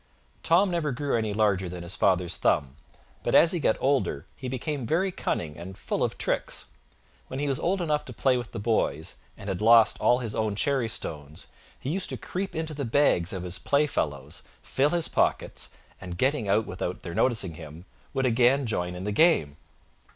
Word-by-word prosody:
Tom 180 +3 +3
never 165 -4 0
grew 140 +3 -1
any 110 -2 0
larger 100 -3 +1
than 90 0 -7
his 85 +2 -2
father's 90 -2 +2
thumb, 70 -1 +1 0.5
but - - 0
as 165 - +7
he 175 - -1
got 125 - +2
older 130 - 0
he 130 - -7
became 130 0 -3
very 185 +8 +1
cunning 80 - -3
and 90 +3 -9
full - - -2
of - - -1
tricks. - - -1 0.6
When 130 - -5
he 145 - -1
was 135 -1 0
old 185 +1 0
enough 150 -2 0
to - - -8
play 130 +3 +2
with 120 -2 -4
the - - -6
boys, 100 -9 -1 0.2
and 100 - -10
had 95 -1 -2
lost 115 0 +6
all 125 - +4
his 115 -4 -4
own 110 -2 -1
cherry 130 +1 +1
stones, 75 -1 -5 0.3
he 135 - -3
used 185 +2 -2
to - - -3
creep 190 +2 -4
into 160 -1 -2
the 145 -1 -4
bags 115 - +3
of 95 -2 -4
his 90 0 -3
play 145 +1 +2
fellows, 75 - -3 0.2
fill 140 +2 +1
his 170 0 +1
pockets, - - 0 0.3
and, 90 -2 -7
getting 130 -4 +1
out 105 +2 +3
without 90 +1 -5
their 85 - -6
noticing 105 -5 +1
him, 80 +2 -10 0.3
would 135 -1 0
again 125 +3 +3
join 90 -5 -2
in 90 - -6
the 105 - -2
game. 100 - +3
115 Hz, 200 wpm, -27 LUFS, 90-140 Hz, 0.6 s, as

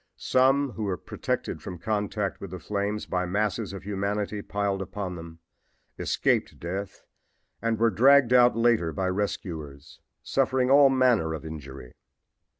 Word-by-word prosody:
Some 135 +1 +2
who 110 -2 -4
were 95 -2 -1
protected - - -4
from 90 - -7
contact 105 +1 -2
with 100 - -6
the 90 - -6
flames 100 +3 -3
by 90 0 -2
masses 105 +2 -1
of 100 - -8
humanity 100 +1 -2
piled 100 -1 -2
upon 95 0 -5
them 80 -1 -10 0.6
escaped - - 0
death 95 +4 -5 0.6
and 115 0 0
were 115 +1 +3
dragged 130 +4 +5
out 125 -2 +5
later 115 -8 +2
by 95 +5 -1
rescuers, 80 -7 -5 0.2
suffering 130 -1 +1
all 140 0 +7
manner 125 -12 +2
of 80 - -9
injury. 70 -5 -9
100 Hz, 145 wpm, -26 LUFS, 90-115 Hz, 0.6 s, all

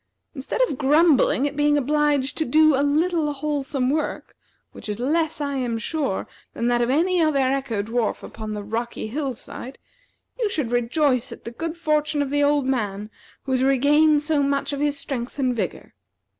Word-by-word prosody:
Instead 270 - -4
of 270 - -5
grumbling 290 -1 +4
at 285 - -6
being 295 0 +3
obliged 290 -1 +1
to 315 - 0
do 310 +2 +4
a 270 - +2
little 310 +2 +1
wholesome 275 -2 -1
work, 310 +1 -3 0.4
which - - -9
is 210 +1 -3
less, 315 +4 0
I 280 -1 -2
am 240 -3 -1
sure, 270 -2 -2 0.3
than 235 - -2
that 240 0 +2
of 240 - +1
any 345 +6 +2
other 310 -3 +2
echo 265 -5 0
dwarf 225 0 -2
upon 215 -1 -6
the 205 - -5
rocky 230 +3 -4
hill 265 +3 -3
side, 255 +3 -10 0.6
you 450 -4 +1
should 290 - -2
rejoice 255 +1 +1
at - - -10
the 230 - -7
good 330 +6 -5
fortune 300 -2 +1
of 275 - -5
the 290 0 +1
old 285 -1 +2
man 210 -5 -2 0.3
who 270 - -5
has 255 -1 +2
regained 295 +3 +4
so 300 -1 +1
much 280 +1 0
of 280 - -3
his 290 0 0
strength 250 -3 -5
and 255 -3 0
vigor. 195 -7 -4
280 Hz, 185 wpm, -23 LUFS, 245-300 Hz, 0.6 s, grumbling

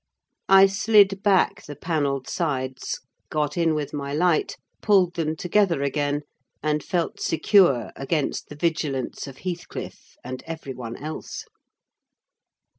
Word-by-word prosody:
I 195 0 +9
slid 200 -1 +4
back 200 0 +2
the 145 - -8
panelled 145 -4 -1
sides, 130 -6 -2 0.3
got 150 -1 -1
in 165 -2 +2
with 145 -1 -3
my 140 -1 -3
light, 170 0 +1 0.2
pulled 190 -4 +4
them 160 -2 -1
together 180 -3 +1
again, 145 +1 0 0.4
and 150 -1 0
felt 175 -2 -2
secure 160 - +3
against 140 +2 -2
the 150 - -8
vigilance 150 -4 -2
of 135 -1 -10
Heathcliff, 175 -2 -7
and 130 0 -6
every 160 -4 -6
one 120 -2 -7
else. 155 +2 -6
155 Hz, 125 wpm, -24 LUFS, 140-180 Hz, 0.4 s, I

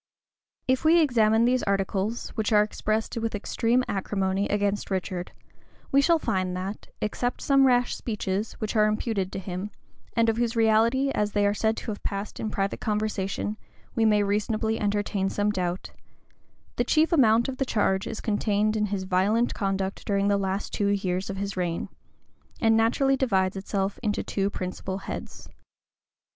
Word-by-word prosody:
[] - - -56
If 260 - -2
we 325 +2 +6
examine 230 -6 +4
these 250 +1 +2
articles, 200 +3 -1
which 220 -1 -2
are 210 -1 +6
expressed 215 +1 -2
with 225 -1 -2
extreme 230 +4 +1
acrimony 195 0 -1
against 205 0 0
Richard, 185 -2 -3 0.6
we 275 - +5
shall 335 +4 +4
find 185 - -1
that, 195 +3 -5
except 245 +3 -2
some 275 -1 +5
rash 245 -1 +2
speeches, 210 -2 -3
which 215 +1 -4
are 215 -1 +5
imputed 215 -3 -1
to - - -5
him,[] 190 +1 -5 0.5
and 230 0 +3
of 225 0 +1
whose 235 0 0
reality, 230 +5 +3
as 210 -4 -1
they 205 -1 +2
are 200 - +3
said 220 +1 0
to - - -4
have 205 - -7
passed 200 +1 -4
in 220 - -2
private 195 -1 -2
conversation, 210 -1 -2 0.4
we 225 - +1
may 210 -2 +4
reasonably 215 +2 0
entertain 205 -1 0
some 205 +1 0
doubt, 180 -2 -3 0.9
the 240 - +3
chief 315 +7 +2
amount 235 -6 +4
of 265 -1 -4
the 270 - +1
charge 195 -6 0
is - - -5
contained 210 0 +1
in 210 -1 +1
his 195 -1 -2
violent 200 +6 +2
conduct 195 -1 -2
during 200 0 +2
the - - +3
two 200 - 0
last 195 +1 -3
years 195 -2 0
of 195 - -4
his 200 0 -3
reign, 175 -2 -2 0.7
and 225 0 +4
naturally 245 +5 +3
divides 195 -8 +1
itself 195 0 -2
into 210 -3 -1
two 195 0 -1
principal 190 0 -4
heads. 195 - -7
210 Hz, 170 wpm, -26 LUFS, 195-225 Hz, 0.9 s, we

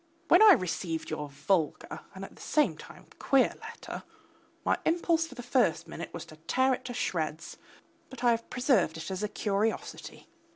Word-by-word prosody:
When 350 - +7
I 430 -2 +10
received 170 - -2
your 150 -2 -4
vulgar 160 +3 -1 0.2
and - - -6
at - - -14
the - - -15
same 300 -1 +2
time - - -13
queer 270 -2 +3
letter, - - -8 0.6
my - - +2
impulse 330 -1 +2
for 260 - -12
the 245 - -7
first 245 - +1
minute 170 - -7
was 170 - -7
to 155 - -14
tear 260 +12 +1
it - - -2
into 245 - -7
shreds, 160 -8 -3 0.5
but 265 -1 -10
I 240 - +5
have 230 0 -2
preserved 240 - +2
it 160 +4 -6
as 190 +1 -3
a 210 - -1
curiosity. 210 +2 -2
215 Hz, 180 wpm, -29 LUFS, 165-260 Hz, 0.6 s, I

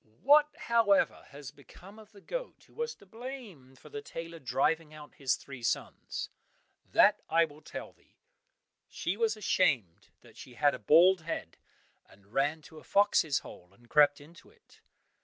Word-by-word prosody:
(What, 295 +2 +6
however, 230 -4 +2
has 140 -3 -10
become 190 +8 -15
of 215 -1 -16
the 200 -2 -16
goat - - -6
who - - -25
was 470 0 -4
to - - -19
blame 220 - -10
for - - -16
the 435 -1 -6
tailor 165 - -8
driving 155 +3 0
out 150 -1 -12
his 135 -2 0
three 135 -3 -11
sons? 115 - -3 0.6
That - - +5
I 165 +1 +4
will 150 -1 -15
tell - - -8
thee. - - -32 0.7
She 175 - -3
was 220 0 0
ashamed 140 - 0
that - - -19
she 125 - -12
had 145 +2 +3
a 125 - -6
bald 175 - +5
head, 160 - -5 0.5
and 100 +2 -22
ran 145 +4 0
to 160 -2 -13
a - - -17
fox's 200 -7 +2
hole 90 - -12
and 120 +2 -24
crept 145 -1 +5
into 160 +4 -16
it. 460 +1 -25
160 Hz, 170 wpm, -30 LUFS, 140-210 Hz, 0.7 s, What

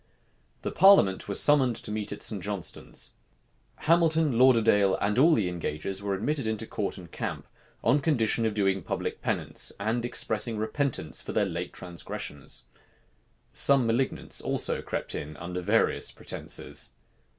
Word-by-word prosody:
The - - -2
parliament 190 - +5
was 100 - -1
summoned 135 -5 +4
to 110 - -4
meet 105 -1 -3
at 105 - -3
St. 105 -4 +1
Johnstone's. 100 -2 -5 0.7
Hamilton, 160 -3 +3
Lauderdale, 115 -6 +4
and 105 +4 0
all 160 +3 +6
the 100 -5 0
engagers 90 +2 -3
were 100 -1 -1
admitted 135 +5 -1
into 110 0 -2
court 105 -2 -3
and 85 -4 -12
camp, - - -5 0.4
on 145 - +3
condition 115 -6 +1
of 105 - -3
doing 95 -2 +1
public - - -4
penance, - - +1
and 110 +4 -1
expressing 110 -2 +1
repentance 110 - -1
for - - -6
their 105 - +2
late 85 -1 -4
transgressions. 80 -5 -5 0.9
Some 140 -3 +5
malignants 120 +4 -1
also - - 0
crept - - -4
in 75 +1 -6
under 90 +1 -5
various 105 +5 +2
pretences. - - -4
110 Hz, 145 wpm, -27 LUFS, 95-130 Hz, 0.9 s, all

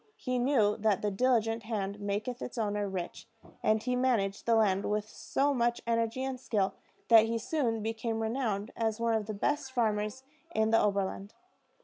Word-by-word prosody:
He 255 -1 -2
knew 240 -5 +3
that 210 -2 +1
the 210 - +1
diligent 225 0 +1
hand 205 -2 -3
maketh 205 +5 -3
its 250 - -6
owner 205 -2 -1
rich, 185 -2 -5 0.3
and 215 0 +2
he 250 0 0
managed 230 -7 0
the 230 - +5
land 200 -3 +3
with 210 0 -1
so 280 +5 0
much 240 -2 +1
energy 230 +2 0
and 265 -1 -3
skill 205 -6 0 0.4
that 225 -1 +8
he 230 +1 -1
soon 230 -3 -1
became 225 0 -2
renowned 225 -2 -1
as 225 -1 -1
one 230 0 +1
of 220 -2 -1
the 215 - -4
best 280 +5 -1
farmers 215 0 -1 0.3
in 220 0 +2
the 225 - +5
Oberland. 200 0 -1
225 Hz, 175 wpm, -30 LUFS, 210-240 Hz, 0.4 s, that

